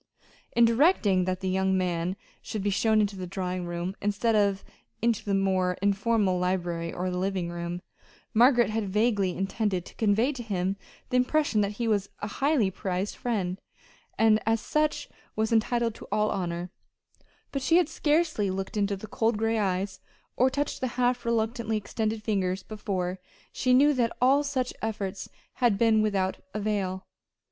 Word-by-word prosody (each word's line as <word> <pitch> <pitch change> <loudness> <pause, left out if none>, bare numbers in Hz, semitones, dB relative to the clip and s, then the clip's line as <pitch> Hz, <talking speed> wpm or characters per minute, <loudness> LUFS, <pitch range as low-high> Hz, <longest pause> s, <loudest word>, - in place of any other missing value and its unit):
In 235 - +6
directing 230 - +3
that 185 0 -2
the 190 - -2
young 190 0 +1
man 180 0 -1 0.3
should 210 -3 -5
be 205 - +1
shown 220 +2 +3
into 205 -1 -1
the 185 -1 -5
drawing 180 -1 -3
room 175 +2 -3
instead 205 +3 +1
of 200 -2 +2 0.4
into 230 -1 +1
the 200 -2 0
more 185 -2 +1
informal 200 -1 +1
library 175 -2 -1
or 180 +1 -3
living 180 -1 -2
room, 175 +1 -5 0.5
Margaret 240 0 +5
had 215 -2 -2
vaguely 205 -3 +1
intended 195 -2 -1
to - - -12
convey 220 +5 +2
to 265 -4 -6
him 195 -4 -1 0.4
the 250 - +3
impression 250 -3 +2
that 200 0 -1
he 230 +2 -2
was 205 -3 +1
a 205 - -3
highly 265 -2 +1
prized 185 +1 -3
friend, 195 -6 -2 0.6
and 220 -1 +5
as 225 +1 +1
such 305 +6 0 0.3
was 220 +1 0
entitled 230 +1 +1
to - - -12
all 210 +1 +2
honor; 175 -1 -3 0.8
but 275 - -2
she 330 +5 +4
had 355 -4 +3
scarcely 310 - +1
looked 190 +2 -4
into 200 -1 +1
the 195 - -8
cold 225 +1 0
gray 225 +1 +1
eyes, 190 -1 -1 0.4
or 255 +2 +4
touched 285 +2 -2
the 260 - +1
half 245 -1 +1
reluctantly 225 -1 0
extended 215 +1 -3
fingers 190 -3 -1
before 190 -4 -3 0.3
she 255 - 0
knew 285 +4 +6
that 240 -4 0
all 270 +3 +4
such 265 -3 -2
efforts 200 -3 -4 0.3
had 235 -5 +4
been 220 0 +4
without 195 -3 0 0.2
avail. 200 -3 -2
205 Hz, 165 wpm, -27 LUFS, 190-230 Hz, 0.8 s, In